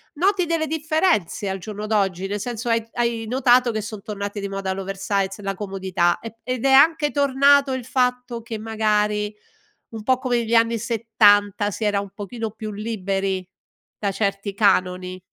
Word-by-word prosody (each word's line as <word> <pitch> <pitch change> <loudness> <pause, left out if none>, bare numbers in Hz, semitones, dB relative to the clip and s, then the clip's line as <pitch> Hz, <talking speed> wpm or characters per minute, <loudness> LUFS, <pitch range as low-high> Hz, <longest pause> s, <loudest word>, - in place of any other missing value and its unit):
Noti 370 +3 +2
delle 330 -1 0
differenze 310 - 0
al 190 - -2
giorno 210 +2 -6
d'oggi? 195 -3 0
Nel 205 +1 -3
senso 240 +2 -4
hai 230 -1 +1
hai 235 -1 -1
notato 250 0 +3
che 220 -1 -2
son 215 -1 -7
tornate 205 -1 -5
di 200 - -3
moda 195 -1 -3
l'oversize, 195 +1 -2
la 195 -1 -3
comodità 190 -3 -1
e 225 0 -9
ed 255 0 -3
è 270 - +4
anche 295 +2 +5
tornato 280 0 +4
il 260 - -3
fatto 250 -2 -1
che 225 -2 -6
magari 210 -1 0 0.6
un 220 -1 -6
po' 255 +2 +3
come 255 -2 0
negli 230 0 -2
anni 230 0 +3
70 205 -3 +3
si 220 - -5
era 205 -1 +2
un 200 -1 -9
pochino 220 +2 -5
più 215 0 -7
liberi 195 -3 -2 0.5
da 200 -2 -1
certi 200 0 -2
canoni? 185 -2 +1
215 Hz, 170 wpm, -22 LUFS, 200-245 Hz, 0.6 s, anche